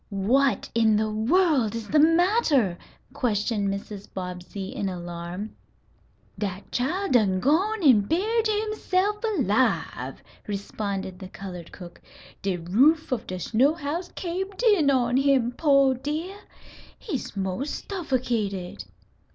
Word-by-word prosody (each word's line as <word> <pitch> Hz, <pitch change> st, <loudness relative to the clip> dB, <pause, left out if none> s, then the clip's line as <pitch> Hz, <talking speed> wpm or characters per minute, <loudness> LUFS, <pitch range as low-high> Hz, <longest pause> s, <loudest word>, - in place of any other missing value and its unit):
"What 240 Hz, +7 st, +1 dB
in 225 Hz, -2 st, +4 dB
the 215 Hz, 0 st, 0 dB
world 255 Hz, -, +2 dB
is 225 Hz, -2 st, -5 dB
the 305 Hz, -, +4 dB
matter?" 330 Hz, -, +3 dB, 0.4 s
questioned 210 Hz, -5 st, 0 dB
Mrs. 200 Hz, 0 st, -6 dB
Bobbsey, 180 Hz, +1 st, -6 dB
in 195 Hz, -, -3 dB
alarm. 175 Hz, +3 st, -6 dB, 0.8 s
"Dat 195 Hz, -2 st, -4 dB
chile 350 Hz, +11 st, -1 dB
dun 205 Hz, -7 st, +3 dB
gwine 370 Hz, -, +1 dB
an' 255 Hz, -8 st, +6 dB
buried 440 Hz, +6 st, +1 dB
himself 420 Hz, -1 st, 0 dB
alive," 235 Hz, -, 0 dB, 0.2 s
responded 200 Hz, -2 st, -4 dB
the 190 Hz, -, -8 dB
colored 180 Hz, -3 st, -9 dB
cook. 175 Hz, -2 st, -11 dB, 0.4 s
"De 190 Hz, -2 st, -1 dB
roof 260 Hz, -, +3 dB
of 245 Hz, -2 st, -2 dB
de 185 Hz, -, -4 dB
snow 255 Hz, -, +2 dB
house 335 Hz, +3 st, -4 dB
cabed 380 Hz, +4 st, -4 dB
in 400 Hz, -, +4 dB
on 250 Hz, -2 st, +2 dB
him, 270 Hz, -3 st, +3 dB
pooh 275 Hz, -1 st, +4 dB
dear! 300 Hz, +9 st, -4 dB, 0.6 s
He's 275 Hz, -, -5 dB
'most 195 Hz, +9 st, -2 dB
stuffocated!" 240 Hz, -, -3 dB
245 Hz, 120 wpm, -25 LUFS, 200-320 Hz, 0.8 s, an